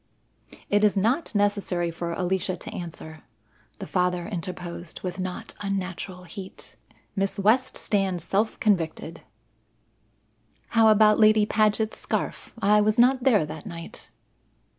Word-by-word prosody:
"It 205 +1 +2
is 210 -1 +3
not 230 - 0
necessary 200 -4 0
for 170 +1 -4
Alicia 185 +1 -1
to - - -9
answer," 160 -2 -8 0.6
the 195 - -6
father 180 -1 0
interposed 175 -3 -6
with 185 0 -4
not 185 -1 -5
unnatural 190 -2 -4
heat. 185 +2 -10 0.4
"Miss 195 0 -1
West 225 +6 +2
stands 190 -5 -1
self 200 +6 0
convicted." 170 -7 -1 1.5
"How 225 -1 +4
about 215 0 +5
Lady 215 -1 +6
Paget's 215 +1 +1
scarf? - - -3
I 210 +1 +4
was 215 +2 +2
not 255 +2 +4
there 215 - +4
that 155 0 -8
night." 170 -3 -9
195 Hz, 125 wpm, -25 LUFS, 180-215 Hz, 1.5 s, Lady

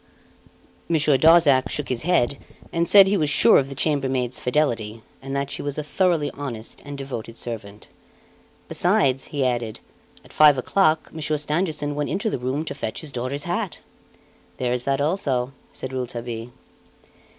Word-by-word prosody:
Monsieur 150 -3 +3
Darzac 145 -3 +5
shook 150 - -3
his 125 -2 -1
head 140 -6 +1 0.3
and 170 0 0
said 200 -1 +9
he 200 +1 +1
was 155 -4 +1
sure - - +6
of 135 -1 -2
the 135 - -7
chambermaid's 130 -4 0
fidelity, 115 -6 -1 0.2
and 135 +1 -5
that 140 0 -2
she - - -4
was 145 -1 -3
a 150 - -2
thoroughly 160 -2 +1
honest 120 -6 -7
and 145 0 -7
devoted 120 -4 -6
servant. 105 -3 -7 0.8
"Besides," 135 -1 +2
he 140 -3 -2
added, 120 -3 -2 0.5
"at - - -16
five 150 -2 +6
o'clock 155 +3 +1
Monsieur 155 -1 -1
Stangerson 150 0 -1
went 145 0 -2
into 210 +2 -1
the - - -2
room 130 +5 -2
to 145 - -4
fetch 125 -6 -5
his 155 - -8
daughter's 130 +3 -3
hat." 175 +2 -3 0.8
"There 125 -1 -1
is 125 0 -2
that 140 0 +1
also," 140 -6 0 0.2
said 130 0 -6
Rouletabille. 120 -2 -5
140 Hz, 160 wpm, -23 LUFS, 125-155 Hz, 0.8 s, said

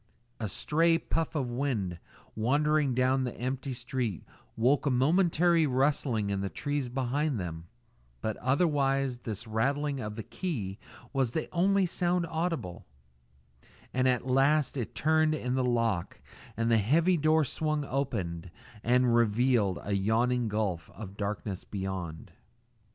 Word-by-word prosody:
A 110 -3 -3
stray 165 - +2
puff 165 0 -2
of 130 -5 -1
wind 115 -10 -2 0.4
wandering 145 +4 +2
down 130 +1 +2
the 125 - -3
empty 130 +2 -3
street 120 -5 -3 0.3
woke 135 +6 +2
a - - +4
momentary 165 +4 +3
rustling 130 -6 +1
in 100 -1 -1
the 100 - -2
trees 145 0 -2
behind 135 +1 -1
them, 85 -2 -6 0.5
but 110 - -2
otherwise 135 -2 +1
this 110 -5 -6
rattling 140 +6 0
of 105 -3 -5
the 110 - -5
key 110 - -4 0.3
was 130 -4 0
the 160 - -2
only 195 +2 +3
sound 175 0 0
audible; 160 - -3 1.1
and 130 +1 +2
at 125 -1 +1
last 135 +2 +3
it 120 -5 -4
turned 155 0 +3
in 125 -4 -2
the 130 0 +1
lock 115 -7 0 0.4
and 115 +1 +1
the 115 - +5
heavy 165 - +3
door 155 0 +3
swung 155 +1 -1
open 95 -12 -3 0.3
and 125 0 +3
revealed 115 -3 +3
a 100 - -2
yawning 115 +5 +1
gulf 105 -6 -2
of 100 0 -8
darkness 100 -2 -4
beyond. 95 -5 -5
125 Hz, 140 wpm, -29 LUFS, 110-150 Hz, 1.1 s, the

